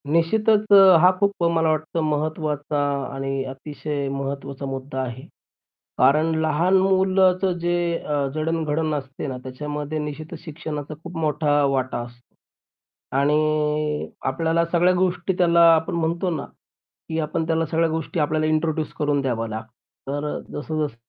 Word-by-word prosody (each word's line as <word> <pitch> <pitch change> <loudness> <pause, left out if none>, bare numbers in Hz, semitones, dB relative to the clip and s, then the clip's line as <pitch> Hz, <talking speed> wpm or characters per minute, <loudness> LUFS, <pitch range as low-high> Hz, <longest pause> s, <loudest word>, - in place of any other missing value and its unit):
निश्चितच 215 +5 +3
अ, 195 -3 +9
हा 180 - +8
खूप 200 0 +2
अ, - - +4
मला 160 -1 +2
वाटतं 155 +2 -2
महत्वाचा 150 -1 -2 0.3
आणि 135 0 -2
अतिशय 145 +1 -5
महत्त्वाचा 140 0 -5
मुद्दा 135 0 -4
आहे. 130 0 -5 0.8
कारण 150 +5 +4
लहान 165 +5 +2
मुलाचं 190 0 +3
जे 175 +1 0 0.2
अ, 145 -2 -1
जडणघडण 155 0 -1
असते 135 0 -5
ना 130 -2 -4
त्याच्यामध्ये 150 +3 -5
निश्चितच 150 +1 -6
शिक्षणाचा 155 -2 -6
खूप 175 0 -8
मोठा 150 -2 +1
वाटा 130 -2 -1
असतो 120 0 -17 0.8
आणि 150 +1 +1 0.2
आपल्याला 165 0 +1
सगळ्या 180 +1 +4
गोष्टी 180 0 0
त्याला, 170 -1 +4
आपण 160 0 -1
म्हणतो 170 +2 0
ना, 160 -4 -3 0.6
की 160 0 -1
आपण 160 +1 -1
त्याला 165 0 +1
सगळ्या 165 0 +1
गोष्टी 160 +2 -3
आपल्याला 155 +1 +1
इंट्रोड्यूस 155 0 0
करून 145 -1 +1
द्याव्या 120 -4 -1
लागतत. 110 0 -6 0.4
तर 145 +2 -3
अ, - - -4
जसं-जस 150 -4 -3
155 Hz, 140 wpm, -23 LUFS, 145-165 Hz, 0.8 s, अ